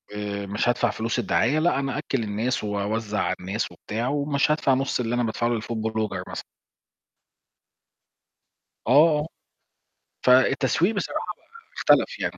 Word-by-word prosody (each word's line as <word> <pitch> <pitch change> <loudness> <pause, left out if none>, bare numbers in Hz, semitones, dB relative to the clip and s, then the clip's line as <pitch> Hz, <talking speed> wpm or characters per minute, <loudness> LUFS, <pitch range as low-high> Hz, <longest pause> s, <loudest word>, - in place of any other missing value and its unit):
آآ، 100 -1 -4
مش 100 +4 -1
هادفع 120 - +2
فلوس 115 +2 -2
الدعاية، 120 +6 +1
لأ 165 -2 +2
أنا 135 -2 -2
أأكل 130 -4 -2
الناس، 110 +4 -2
وأوزع 105 +1 -2
على - - 0
الناس 100 +5 -3
وبتاع، 115 +3 -4
ومش 145 +1 +1
هادفع 150 -3 +2
نص 135 0 0
اللي 120 -1 -1
أنا 120 - +1
بادفعه 115 +1 -1
للfood 110 0 -3
blogger 105 -4 -2
مثلًا." - - -6 2.5
آه، 150 +4 +6
آه. 150 - -4 1.0
فالتسويق 130 - +3
بصراحة 200 - -3
بقى 455 -1 -21
اختلف - - +2
يعني. - - -3
120 Hz, 140 wpm, -24 LUFS, 110-140 Hz, 2.5 s, آه